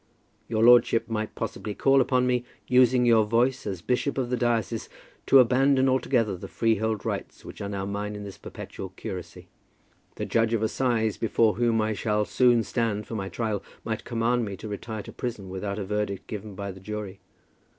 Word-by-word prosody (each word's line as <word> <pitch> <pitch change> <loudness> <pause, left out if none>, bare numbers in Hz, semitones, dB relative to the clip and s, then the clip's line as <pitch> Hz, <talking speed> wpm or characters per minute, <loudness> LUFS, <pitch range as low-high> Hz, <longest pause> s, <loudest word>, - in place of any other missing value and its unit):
Your 110 -1 +1
lordship 120 -1 +6
might 110 -1 -3
possibly 105 - -4
call 135 0 +4
upon 125 0 +2
me, 125 -1 +1 0.2
using 125 -1 +4
your 115 -2 +5
voice 120 +3 +1
as 95 -4 -4
bishop 125 +5 0
of 125 -2 -1
the - - +2
diocese, 120 -5 -1 0.4
to 135 - +7
abandon 130 +2 +4
altogether 125 -5 +1
the 90 - -8
freehold 110 -1 0
rights - - -4
which - - -9
are 100 - -3
now 100 -1 -3
mine 105 +1 -3
in 105 - -6
this 100 -2 -9
perpetual 95 - -8
curacy. 95 -4 -7 0.7
The - - -3
judge 115 0 +2
of 110 - -1
assize, 110 -2 0
before 115 -1 +2
whom 115 -1 +2
I 110 0 0
shall 105 0 0
soon 120 -1 +3
stand 110 -4 -1
for - - -8
my 95 -3 -3
trial, 110 -3 -2 0.2
might 110 -1 -3
command 120 +1 0
me 100 -3 -5
to 110 - -8
retire 105 +1 -5
to - - -10
prison 110 -6 -5
without 100 +2 -4
a 100 - -3
verdict 105 -1 -2
given 105 -1 -7
by 100 0 -5
the 95 - -11
jury. 105 -1 -6
110 Hz, 190 wpm, -26 LUFS, 105-120 Hz, 0.7 s, to